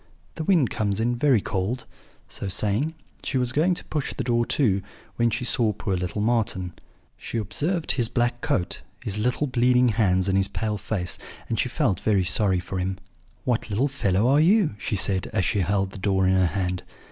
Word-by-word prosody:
The 160 - -4
wind 160 - +3
comes 100 -1 -1
in 120 +2 +1
very 125 -3 +3
cold.' 105 +6 -2 0.4
So 100 - -6
saying, 105 - 0 0.3
she 135 - -1
was 125 -1 0
going 165 +7 +2
to - - -7
push 150 -3 -3
the 130 - -2
door 120 -1 +1
to, 100 -9 +2 0.4
when 120 0 +3
she 120 +3 -2
saw 115 -2 +3
poor 100 -1 -2
little 90 +3 -2
Marten. 105 -6 0 0.4
She - - -5
observed 155 - 0
his 120 -4 +1
black 120 0 0
coat, 140 - -1 0.2
his 105 0 -3
little 125 +6 +1
bleeding 125 -1 +3
hands, 95 -4 +2
and 95 - +1
his 95 0 +3
pale 105 -2 -3
face, 95 -3 -3 0.3
and - - -1
she - - +1
felt 95 -2 0
very 100 -3 +2
sorry 95 +1 +2
for 90 +1 -4
him. 95 +1 -2 0.5
'What 120 -4 -1
little 110 +7 +1
fellow 110 -6 +1
are 140 +3 +4
you?' 185 - +4
she 105 - -2
said, 95 -1 0
as 95 -4 +1
she 100 - +1
held 95 +1 0
the 100 - -9
door 95 -1 +1
in 95 - +3
her 95 -1 +3
hand. 90 0 -2
110 Hz, 200 wpm, -25 LUFS, 95-125 Hz, 0.5 s, are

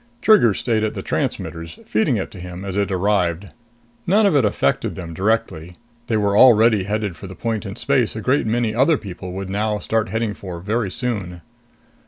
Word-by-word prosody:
Trigger 180 - +5
stayed 110 0 0
at 110 - -2
the - - -5
transmitters, 80 0 -3
feeding 110 +3 +1
it 95 - -4
to 95 - -11
him 90 +1 -8
as 95 -1 -4
it 100 0 0
arrived. 95 -1 0 0.6
None 205 +4 +4
of 195 -6 +3
it 140 - +4
affected 100 -9 0
them 85 -2 -7
directly 90 -3 -1 0.3
they 110 - +1
were 100 -1 +1
already 110 -4 +6
headed 105 -2 -2
for 95 - -10
the 95 - -10
point 110 +1 -3
in 100 - -6
space 125 -3 0
a - - -3
great 130 +2 +1
many 115 0 0
other 135 +7 +3
people 95 -4 -8
would 95 0 -5
now 105 +1 0
start 110 -1 -1
heading 110 0 -1
for 90 -4 -8
very 105 +3 -1
soon. 95 -5 -4
105 Hz, 195 wpm, -21 LUFS, 95-115 Hz, 0.6 s, already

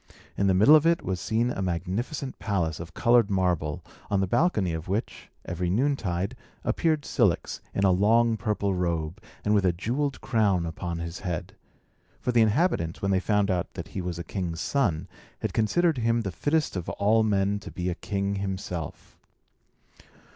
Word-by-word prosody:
In 100 - +1
the 95 - +4
middle 110 +11 +7
of 155 +1 +5
it 170 0 +2
was 95 -2 -2
seen 115 +5 +1
a 95 - -3
magnificent 95 - -3
palace 85 -7 -1
of 85 -1 -9
coloured 120 -3 +4
marble, 90 -6 0 0.3
on 100 - +2
the 95 - +2
balcony 100 - +1
of 80 0 -5
which, 100 +5 -3 0.2
every 90 +1 -2
noontide, 100 -5 0 0.3
appeared 155 -3 +1
Cilix, - - +1
in 100 - -1
a 95 - +5
long 115 +5 +4
purple 100 -1 -1
robe, 85 0 -2 0.2
and 105 - +3
with 100 -2 +3
a 90 - +4
jewelled 125 - -2
crown 100 -7 +1
upon 85 +1 -4
his 85 +1 -5
head; 90 -4 -4 0.7
for 125 - -1
the 120 -1 +4
inhabitants, 110 - +1
when 100 - +1
they 95 - +3
found 105 0 +1
out 90 0 -1
that 85 -6 -6
he 95 - -4
was 90 -2 -4
a 85 - -4
king's 85 -3 -4
son, 95 - 0 0.3
had - - -2
considered 155 +7 +2
him 115 0 +2
the 100 -4 -3
fittest 150 - 0
of 90 -2 -3
all 110 +3 +3
men 100 -1 +1
to - - -9
be 90 -1 -4
a 90 - 0
king 100 +2 -2
himself. 95 -4 -5
100 Hz, 180 wpm, -27 LUFS, 90-115 Hz, 0.7 s, middle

